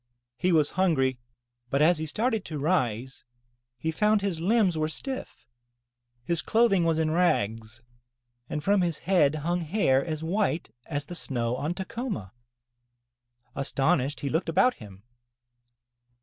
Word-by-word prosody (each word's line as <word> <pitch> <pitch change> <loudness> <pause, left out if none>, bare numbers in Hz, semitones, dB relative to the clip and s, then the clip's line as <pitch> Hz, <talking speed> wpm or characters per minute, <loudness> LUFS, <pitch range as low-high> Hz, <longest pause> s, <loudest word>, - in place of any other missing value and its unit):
He 180 +8 0
was 155 -3 +3
hungry 135 -9 +1 0.5
but 140 - +1
as 155 +2 +4
he 160 - -3
started 220 - 0
to 155 - -5
rise, 130 -6 -1 0.5
he 160 +7 -2
found 210 +4 +2
his 190 -5 -1
limbs 195 0 +2
were 155 0 0
stiff, 265 - -6 0.8
his 170 +5 0
clothing 220 -6 +3
was 165 -1 +2
in 160 -1 +1
rags 115 - 0 0.7
and 150 - -3
from 200 +3 +3
his 170 -4 0
head 165 -6 +2
hung 170 +4 -1
hair 155 -6 +2
as 155 -1 -4
white 170 - -1
as 145 -2 -3
the 175 - -8
snow 125 -7 -1
on 150 +6 -2
Tacoma. 200 - -5 1.2
Astonished, 140 +1 0
he 140 - -2
looked 165 +4 -1
about 250 +10 +4
him. 100 -2 -13
160 Hz, 140 wpm, -27 LUFS, 140-185 Hz, 1.2 s, as